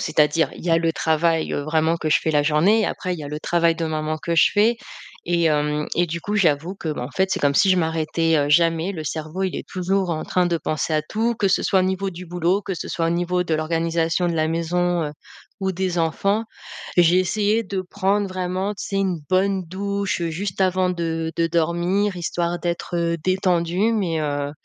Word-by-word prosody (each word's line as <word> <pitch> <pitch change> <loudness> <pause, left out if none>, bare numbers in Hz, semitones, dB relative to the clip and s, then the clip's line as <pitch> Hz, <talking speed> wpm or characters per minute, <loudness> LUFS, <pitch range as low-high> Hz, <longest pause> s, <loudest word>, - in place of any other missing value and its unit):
c'est-à-dire 155 +1 +2
il - - -11
y 175 - 0
a 165 - +5
le 165 -1 +1
travail, 160 +1 +1
heu, - - -1
vraiment 160 +2 +1
que 160 - -3
je - - +5
fais 160 - -1
la 145 -1 +3
journée, 175 +9 +3
après 180 -1 -3
il - - -8
y - - -7
a 145 - -6
le 150 - -4
travail 170 0 +2
de 165 - -2
maman 155 0 -2
que 170 +2 -2
je 165 - +5
fais 220 +3 +3 0.5
et 170 -1 +1
hem, 150 -1 +1
et 175 0 +2
du 170 +1 -4
coup, 205 +5 -3
j'avoue 165 -1 +1
que, 175 - -6
bah, 145 - -5
en 125 - -6
fait, 190 0 +1
c'est - - 0
comme 140 -1 +2
si 195 +6 +4
je 185 - +4
m'arrêtais, 160 -1 +1
heu, 145 0 +1
jamais, 165 +3 +3
le 160 -4 -6
cerveau 155 +5 -4
il 185 - -2
est - - -7
toujours 185 0 -1
en 155 -2 -2
train 180 -1 +1
de 170 -1 +1
penser 155 0 -2
à 155 - +1
tout, 225 +8 -1
que 205 - +1
ce 190 - +2
soit 190 - +2
au - - +2
niveau 190 +1 -1
du 180 0 -9
boulot, 175 +3 0
que 195 - -4
ce - - -6
soit 165 -1 -1
au - - +1
niveau 175 +1 0
de 165 - 0
l'organisation 165 +2 0
de 170 - -1
la 155 -1 +1
maison, 175 +1 0
heu, 150 - -4 0.5
ou 190 0 0
des 185 -1 -2
enfants. 195 +7 0 0.5
J'ai 175 +1 +5
essayé 210 +4 +1
de 190 -1 -3
prendre 200 +2 0
vraiment, 185 +1 -2
tu - - -7
sais, 195 - -3
une 190 -4 0
bonne 190 0 +1
douche 200 +1 -2
juste 180 +4 -4
avant 185 -1 +2
de 165 -2 -2
de 165 0 +2
dormir, 175 +4 0
histoire 175 0 -2
d'être, 175 0 -3
heu, 170 0 0
détendue 185 +2 +1
mais 180 -7 0
heu, 145 -1 -2
170 Hz, 230 wpm, -22 LUFS, 160-185 Hz, 0.5 s, a